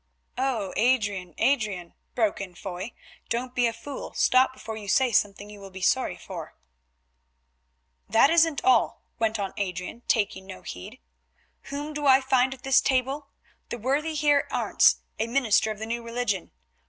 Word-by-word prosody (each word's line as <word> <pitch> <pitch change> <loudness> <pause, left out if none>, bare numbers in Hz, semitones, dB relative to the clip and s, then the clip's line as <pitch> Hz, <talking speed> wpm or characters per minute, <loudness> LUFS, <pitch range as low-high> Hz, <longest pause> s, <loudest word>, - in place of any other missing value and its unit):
"Oh! 245 -8 -1
Adrian, 205 -8 +1
Adrian," 210 -10 0 0.2
broke 220 -4 +1
in 185 -3 -7
Foy, 190 +5 -6 0.4
"don't 245 +2 -2
be 245 -1 +2
a - - 0
fool; 245 +5 -8
stop 255 +1 +4
before 225 -4 -8
you 210 -2 -8
say 255 +5 +3
something 205 -1 +1
you 210 0 -11
will 195 -1 -10
be 190 0 -8
sorry 260 +7 +1
for." - - -8 1.5
"That 225 +8 +5
isn't 325 -3 +3
all," 250 -3 +3 0.2
went 225 -1 +1
on 195 -2 -3
Adrian, 185 +3 -4
taking 190 -3 0
no 90 - -9
heed. 90 - -8 0.7
"Whom 290 +2 -5
do 295 -1 -1
I 265 0 +7
find 265 -1 +2
at 255 - -22
this 270 0 +4
table? 270 +2 0 0.4
The - - -4
worthy 285 +7 -1
Heer 290 -1 +3
Arentz, - - +3 0.2
a 225 - 0
minister 230 -4 +2
of 215 - -4
the 220 - -5
New 235 +1 -3
Religion. 230 -5 -2
235 Hz, 165 wpm, -26 LUFS, 205-265 Hz, 1.5 s, I